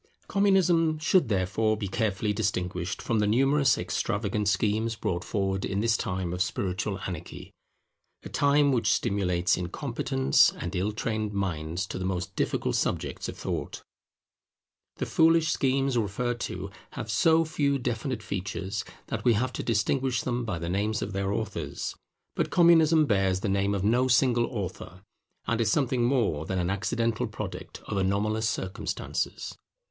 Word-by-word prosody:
Communism 180 -5 +3
should 155 -2 +2
therefore 105 +2 +1
be 105 - -3
carefully 105 0 0
distinguished 90 -3 -2
from 115 -2 +1
the 105 - +2
numerous 135 +5 +3
extravagant 105 0 -1
schemes 110 +3 +1
brought 90 -5 -2
forward 95 -2 -1
in 100 - -1
this 115 +1 +2
time 90 -2 -2
of 90 - -3
spiritual 95 +1 -1
anarchy; 85 -3 -7 0.7
a - - -7
time 145 0 +3
which 125 -3 +2
stimulates 90 -3 +1
incompetent 70 -6 +2
and 90 +3 -5
ill 95 +4 0
trained 110 -1 -2
minds 90 -2 -2
to 95 - -6
the - - -3
most 90 -1 -3
difficult - - 0
subjects - - -2
of - - -7
thought. - - -4 1.1
The - - -3
foolish 165 0 +4
schemes 135 -1 +1
referred 120 +3 -1
to 95 +2 -6 0.2
have 115 -5 -5
so 160 +9 +4
few 145 -3 +1
definite 120 -1 -3
features, 95 +1 -3 0.2
that - - -4
we 120 - +5
have 125 +4 0
to - - -3
distinguish 120 +3 0
them 125 -1 -2
by 95 -6 -2
the 85 0 -5
names 105 +4 0
of 100 - -5
their 100 0 -1
authors. 105 0 -3 0.4
But - - 0
Communism 165 -2 +5
bears 95 -5 +1
the 100 - -1
name 100 +1 +1
of 95 - -2
no 120 +5 +3
single 120 -2 +3
author, 95 -4 -6 0.4
and 115 0 0
is 110 -1 +2
something 130 -3 +1
more 105 - +1
than 95 - -2
an 90 0 0
accidental 115 +3 -1
product - - -7
of 100 - -3
anomalous 105 +3 +1
circumstances. 95 +2 -3
105 Hz, 155 wpm, -27 LUFS, 95-125 Hz, 1.1 s, we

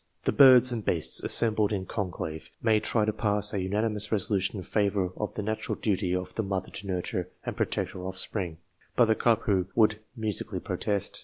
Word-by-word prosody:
The - - +1
birds 130 -3 +7
and 115 -3 -3
beasts 85 -5 +2
assembled 110 -2 +3
in 95 -3 -2
conclave 90 -6 -5
may 110 -2 +3
try 110 0 +1
to 110 - 0
pass 105 -1 0
a 100 - -1
unanimous 105 +2 -1
resolution 100 -1 0
in 95 - -5
favour 100 -2 0
of 105 - -4
the 105 - -3
natural 110 +1 -2
duty 95 -3 0
of 90 0 -4
the 110 - -1
mother 95 -3 -3
to 100 - -8
nurture 90 -2 -3 0.2
and - - -4
protect - - -1
her 90 - -8
offspring, 95 -2 -3 0.4
but 120 - +5
the 110 - +3
cuckoo 105 -6 +2
would 110 -1 +3 0.2
musically 110 -4 -3
protest. 100 -2 -2
105 Hz, 185 wpm, -28 LUFS, 95-110 Hz, 0.4 s, birds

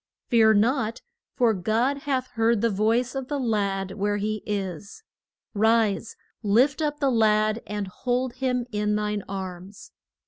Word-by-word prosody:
Fear 220 -3 +5
not, 230 +1 +1 0.3
for 240 -4 +3
God 225 +8 0
hath 260 -2 0
heard 225 -2 +1
the 230 -1 +2
voice 225 +5 +1
of 270 -2 -4
the 290 - -2
lad 200 -6 -1
where 205 +1 -1
he 215 +1 -2
is. 200 - -4 0.5
Rise, 220 0 +2 0.3
lift 250 +8 +3
up 295 -1 -1
the 275 -2 +2
lad 215 -1 +2
and 210 -1 -3
hold 245 +6 -2
him 250 -2 -1
in 210 0 0
thine 210 -1 -1
arms. 190 0 -7
220 Hz, 145 wpm, -25 LUFS, 205-250 Hz, 0.5 s, Fear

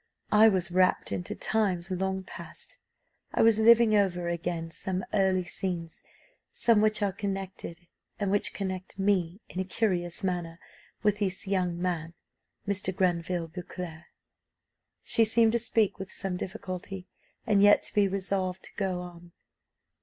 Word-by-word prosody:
I 220 +1 +7
was 185 -3 0
rapt 185 +1 +2
into 180 +4 -3
times 190 -4 0
long 190 +1 -1
past: - - -8 0.6
I - - +4
was 225 -1 +5
living 230 0 +6
over 180 -4 +2
again 170 -1 -3
some 185 +2 -2
early 190 -2 +3
scenes 175 -2 -4 0.5
some 230 -3 +3
which 215 0 +2
are 200 - +2
connected, 195 -3 -5 0.3
and 200 -2 0
which 205 - +1
connect 185 -2 -5
me, 195 -1 +1
in 180 - -6
a - - +1
curious 185 -2 -1
manner, 175 -3 -2 0.5
with 210 -1 +2
this 190 -1 -1
young 180 -3 0
man, 170 -2 -2 0.5
Mr. 195 -2 -1
Granville 175 -2 0
Beauclerc." 175 -1 -7 1.0
She 230 - +3
seemed 225 0 +4
to 235 - +1
speak 220 -3 +1
with 190 0 -6
some 190 -2 -3
difficulty, 185 0 -6 0.4
and 210 -4 +3
yet 205 0 +6
to - - -4
be 205 -1 +4
resolved 190 -1 -2
to - - -13
go 190 -3 -1
on. 175 -1 -11
190 Hz, 145 wpm, -29 LUFS, 175-205 Hz, 1.0 s, I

